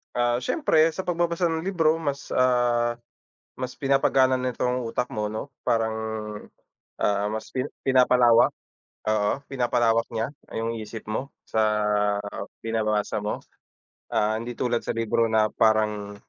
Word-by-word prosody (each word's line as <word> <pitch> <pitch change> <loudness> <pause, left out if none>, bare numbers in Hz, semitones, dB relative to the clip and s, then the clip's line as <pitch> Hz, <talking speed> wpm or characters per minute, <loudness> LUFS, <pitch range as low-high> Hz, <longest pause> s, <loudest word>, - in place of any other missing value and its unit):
Ah, 120 0 +2
siyempre 160 - +3
sa 190 - -3
pagbabasa 170 0 0
ng 160 0 -2
libro 165 -4 +2
mas, 140 -3 -4
ah, 120 -2 +2 0.6
mas 130 0 -4
pinapagana 135 -1 +3
nito 125 -1 -3
ang 125 -1 0
utak 125 +2 -2
mo, 105 -5 -2
'no, 110 +6 -4 0.2
parang, 115 -2 +1 1.1
ah, 100 0 +2
mas 110 0 -5
pina 130 +2 -2
pinapalawak, 125 -2 +5 0.6
oo, 105 -1 +2 0.2
pinapalawak 120 -3 +2
niya 115 +5 -2 0.2
yung 115 +1 -1
isip 110 0 -7
mo 130 +6 -3
sa 105 -1 +1 0.8
binabasa 110 -2 0
mo. 105 +1 -3 0.7
Ah, 110 +1 +1
hindi 120 +1 -6
tulad 120 -1 0
sa - - -3
libro 115 0 +1
na 110 -1 +2
parang, 105 -2 +1
120 Hz, 135 wpm, -25 LUFS, 110-130 Hz, 1.1 s, pinapalawak